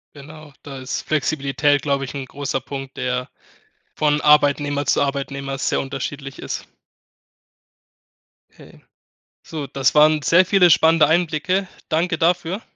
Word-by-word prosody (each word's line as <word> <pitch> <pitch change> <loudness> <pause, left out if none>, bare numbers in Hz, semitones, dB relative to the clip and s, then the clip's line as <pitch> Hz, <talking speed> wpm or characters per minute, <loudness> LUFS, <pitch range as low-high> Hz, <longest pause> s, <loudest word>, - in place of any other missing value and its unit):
Genau, 150 +1 -13
da 140 -2 -8
ist 130 0 -5
Flexibilität, 145 -1 0
glaube 140 -1 0
ich, 135 - -7
'n 135 -1 -5
großer 135 0 -4
Punkt, 135 0 -8
der 125 0 -2 0.7
von 150 -1 +1
Arbeitnehmer 145 -1 +3
zu - - +1
Arbeitnehmer 140 -1 -3
sehr 140 - -1
unterschiedlich 135 0 -6
ist. - - -6 1.9
Okay. - - -17 0.6
So, 150 -4 -6
das 135 +1 0
waren 155 0 +5
sehr 170 +7 +4
viele 185 -2 +4
spannende 160 -1 +5
Einblicke. 175 +3 0 0.2
Danke 165 +1 0
dafür. 175 +4 0
145 Hz, 125 wpm, -20 LUFS, 135-160 Hz, 1.9 s, waren